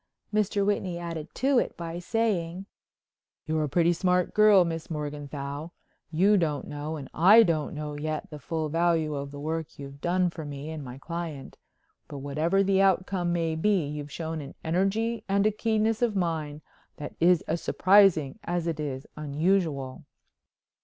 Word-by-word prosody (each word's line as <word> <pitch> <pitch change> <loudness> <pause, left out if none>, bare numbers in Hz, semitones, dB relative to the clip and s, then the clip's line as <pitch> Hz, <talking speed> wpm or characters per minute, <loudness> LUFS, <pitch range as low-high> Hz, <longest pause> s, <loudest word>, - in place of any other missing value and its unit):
Mr. 205 -1 +1
Whitney 195 -4 -1
added 165 -2 -5
to 270 -1 +3
it - - -3
by 170 0 -5
saying: 190 -3 -1 0.8
"You're 155 -1 0
a - - -5
pretty 170 +3 +3
smart 180 0 +1
girl, 210 -4 +6
Miss 165 -1 -4
Morganthau. 145 -1 -5 0.4
You 190 +6 +4
don't 155 -5 -1
know 150 +2 -5
and 140 -3 -7
I 205 +8 +7
don't 160 -6 -1
know 150 0 -5
yet 155 +1 -4
the 150 - -7
full 160 +2 -3
value 165 -1 +1
of 140 -1 -4
the 145 0 -9
work 160 +1 -4
you've 140 0 -10
done 180 0 +1
for 160 - -7
me 145 +1 -6
and 155 -2 -6
my 125 -1 -8
client. 165 -2 -6 0.5
But 145 - -8
whatever 155 +8 +1
the 195 0 +3
outcome 185 -2 +1
may 165 -2 0
be 180 +1 +1
you've 145 0 -6
shown 160 -1 -4
an 140 0 -10
energy 195 +7 0
and 200 +1 +2
keenness 220 0 +1
of 235 -4 +1
mind 160 -5 -2 0.4
that 145 - -7
is 175 0 +4
as 165 +1 -2
surprising 185 -8 +4
as 175 -1 -2
it 165 -2 -2
is 140 -2 -4
unusual." 150 -2 -1
165 Hz, 165 wpm, -27 LUFS, 150-185 Hz, 0.8 s, I